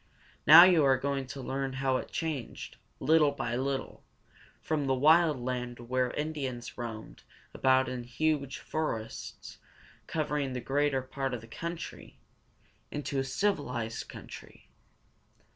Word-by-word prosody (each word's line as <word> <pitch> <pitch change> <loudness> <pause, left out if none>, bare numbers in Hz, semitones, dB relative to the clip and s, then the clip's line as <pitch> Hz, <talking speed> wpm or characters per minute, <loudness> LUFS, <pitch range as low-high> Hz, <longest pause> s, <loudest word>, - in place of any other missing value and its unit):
Now 160 +4 +12
you 180 -4 +6
are 135 -1 +4
going 135 0 -2
to 135 0 -7
learn 135 0 -2
how 130 -1 +1
it - - -6
changed, 155 -8 -4 0.2
little 155 -1 +4
by 120 -4 -3
little, 135 +1 -3 0.6
from 150 -3 -1
the 135 - +2
wild 155 +1 +5
land 125 -1 -3
where 125 +1 0
Indians 140 -6 -4
roamed 115 -3 -7 0.3
about 130 0 +3
in 125 -1 -4
the 120 - -12
huge 140 +1 -1
forests 135 -9 -5 0.5
covering 150 -4 -1
the 125 - -3
greater 135 +1 0
part 135 -1 -3
of 115 - -7
the 115 - -13
country, 170 +8 -7 0.7
into 145 -1 -3
a - - +1
civilized 135 - -2
country. - - -12
135 Hz, 135 wpm, -30 LUFS, 125-150 Hz, 0.7 s, Now